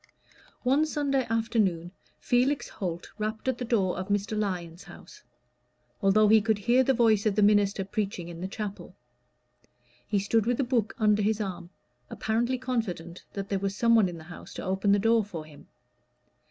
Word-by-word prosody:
One 275 +5 +3
Sunday 280 -4 0
afternoon 215 -7 0 0.3
Felix 255 +4 +1
Holt 175 -3 -5
rapped 215 +3 -3
at 260 -2 0
the - - -2
door 200 -6 +1
of 185 - -4
Mr. 205 +1 -1
Lyon's 180 -3 -3
house, 175 - -14 0.8
although 210 +2 +4
he 220 +1 +6
could 220 0 +1
hear 240 +5 +3
the 265 +1 +2
voice 220 -3 +3
of 205 - +1
the 210 - +3
minister 205 -1 +3
preaching 195 -4 -3
in 170 -1 -8
the 185 - -3
chapel. 200 -2 -7 1.1
He 205 - 0
stood 210 +3 +1
with 245 -1 +1
a - - +3
book 240 -4 0
under 210 -2 +3
his 215 +1 +1
arm, 180 -4 -5 0.4
apparently 235 +4 -1
confident 210 -10 -4
that 195 -1 -5
there 195 - 0
was 195 0 -2
someone 230 -4 +4
in 175 - -7
the 160 - -11
house 175 +2 -11
to - - -6
open 190 +2 +1
the 200 - +5
door 225 +2 +3
for 175 -6 -7
him. 150 -2 -16
210 Hz, 180 wpm, -27 LUFS, 190-230 Hz, 1.1 s, he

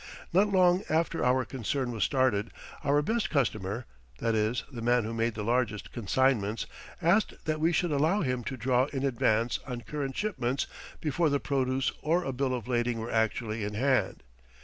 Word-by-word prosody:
Not 195 +4 +5
long 185 -2 +4
after 165 +1 +1
our 130 0 +3
concern 130 +1 -2
was 110 -4 -1
started 125 -6 +2 0.3
our 145 +1 +3
best 225 +6 0
customer 115 -5 -1 0.3
that 115 -1 0
is, 110 +3 +1
the 120 -3 -6
man 120 0 +3
who 110 +2 -4
made 115 0 0
the 105 - -3
largest 115 -2 0
consignments 115 -1 +1 0.4
asked 185 +6 +2
that 155 -1 -1
we 165 +2 +3
should 175 -1 +1
allow 160 +8 +2
him 125 -2 -1
to 135 - -4
draw 125 +2 +2
in 135 -1 -4
advance 115 -2 +1
on 125 -2 -4
current 135 +2 -4
shipments 135 - -1 0.4
before 155 +2 +1
the 140 0 +1
produce 130 -2 0
or 170 +4 +1
a 135 - -3
bill 130 0 0
of 120 -3 -6
lading 120 -1 0
were 115 +1 -4
actually 110 0 0
in 105 +1 -3
hand. 130 +3 +1
130 Hz, 180 wpm, -29 LUFS, 115-145 Hz, 0.4 s, Not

